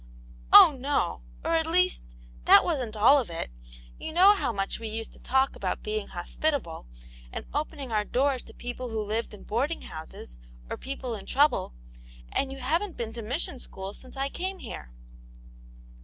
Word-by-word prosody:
" - - -20
Oh, 300 - +10
no; 265 - 0 0.2
or, - - +1
at 320 -1 +1
least, 365 +2 +3 0.4
that - - +9
wasn't 255 -10 -2
all 240 +7 +6
of 245 - -4
it. 165 - -5 0.5
You - - -5
know 375 +4 +8
how 390 - -1
much 195 -2 -2
we 225 - -5
used 225 +1 -5
to - - -17
talk 265 +1 +1
about - - -3
being 430 0 -2
hos - - -8
pitable 280 - -1 0.4
and - - -6
opening 285 -3 -3
our 210 -1 +2
doors 260 +3 +1
to - - -13
people 245 +1 -5
who 225 -1 -3
lived 220 +3 -2
in 210 - -11
boarding 275 +9 -1
houses, 110 - -9 0.3
or - - -1
people 265 -2 -5
in 210 - -7
trouble. 285 - +2 0.6
And 270 - 0
you 270 - -7
haven't 330 +9 -1
been 225 -1 -4
to 235 - -6
mission 255 +4 -2
school 195 -3 -7
since 255 +4 -12
I 275 +1 0
came 375 +5 -3
here." - - -8
255 Hz, 185 wpm, -27 LUFS, 215-300 Hz, 0.6 s, Oh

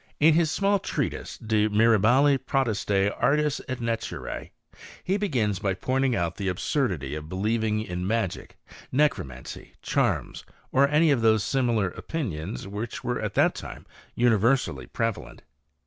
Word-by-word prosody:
In 155 +2 +6
his 165 0 +3
small 200 +4 +2
treatise - - -3
De 110 -1 +1
Mirabili 115 +6 +4
Potestate 105 -7 0
Arti^ 150 +1 +2
et 130 -2 -4
Naturce, 115 -1 -4 0.5
he 190 - 0
begins 120 - 0
by 95 -3 -1
pointing 130 +4 0
out 85 -2 -2
the 100 - -3
absurdity 90 - -1
of 75 0 -6
believing 110 +3 0
in 90 -2 -4
magic, 110 -4 -2 0.3
necromancy, 100 - -2
charms, - - -1 0.3
or 140 +1 +4
any 150 +2 +4
of 130 -4 +2
those 110 -2 +4
similar 120 -7 +1
opinions 95 - -5
which 105 +4 -5
were 120 - -2
at - - -4
that - - +4
time - - -9 0.3
universally 120 +2 +2
prevalent. 115 -2 -4
115 Hz, 135 wpm, -26 LUFS, 100-135 Hz, 0.5 s, In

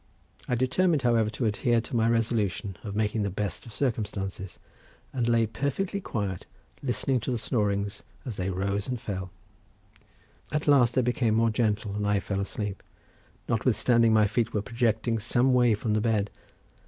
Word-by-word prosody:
I 125 - +1
determined, 140 +5 +2
however, 115 -3 +3
to 115 +3 -3
adhere 115 +2 +2
to 120 - -6
my 115 0 +3
resolution 110 -4 0
of 100 -1 -5
making 110 +1 0
the 100 - 0
best 100 +3 -4
of - - -10
circumstances, 100 -6 -3 0.6
and 120 -2 0
lay 115 -1 +4
perfectly 140 - -2
quiet, 100 - -3 0.3
listening 130 0 0
to 115 - -4
the 125 - 0
snorings 100 -3 -1 0.2
as 120 -5 -4
they 90 +1 -1
rose 100 +2 -1
and 125 -2 -2
fell; 95 -3 -4 1.2
at 150 0 -1
last 125 -5 +5
they 130 - +3
became 120 -2 +1
more 115 0 +3
gentle 105 -2 0
and 105 0 -1
I 105 -1 +3
fell 100 +1 -3
asleep, 100 0 -3 0.7
notwithstanding 115 0 +3
my 110 -1 +5
feet 115 +2 0
were 105 - 0
projecting 115 -1 0
some 125 +4 +2
way 120 -3 +4
from 105 +1 -2
the 105 - +2
bed. 105 -3 +1
110 Hz, 165 wpm, -27 LUFS, 105-120 Hz, 1.2 s, last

